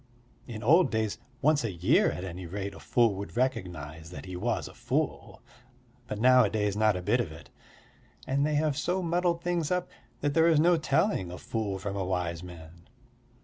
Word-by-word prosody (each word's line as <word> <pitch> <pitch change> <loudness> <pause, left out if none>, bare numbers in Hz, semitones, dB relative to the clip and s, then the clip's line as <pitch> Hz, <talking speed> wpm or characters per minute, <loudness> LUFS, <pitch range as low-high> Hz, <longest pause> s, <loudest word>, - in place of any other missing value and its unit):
In 115 -2 -7
old 165 +10 +5
days, 110 -1 -1 0.2
once 150 -1 +3
a 115 - -1
year 85 +1 +3
at 90 - -5
any 90 -1 -6
rate 100 +3 -5
a - - -11
fool 115 -3 +2
would 100 +4 -7
recognise 90 - -2
that 90 - -9
he 90 -1 -7
was 110 +5 -1
a - - -12
fool, - - -3 0.6
but 105 - -4
nowadays 110 -5 +4
not 110 -1 +3
a 90 - -4
bit 110 +7 +2
of 85 - -5
it. 80 +1 -13 0.7
And 140 +2 +1
they 150 0 +1
have 150 -1 +1
so 180 +6 -1
muddled 170 0 0
things 175 -4 0
up 180 0 -1 0.3
that 145 0 0
there 160 +2 +4
is 160 -3 +4
no 175 +3 +5
telling 160 - +1
a 90 - -7
fool 100 +5 -3
from 100 0 -4
a 100 - -1
wise 90 -3 -2
man. 85 -1 -12
110 Hz, 190 wpm, -29 LUFS, 90-150 Hz, 0.7 s, old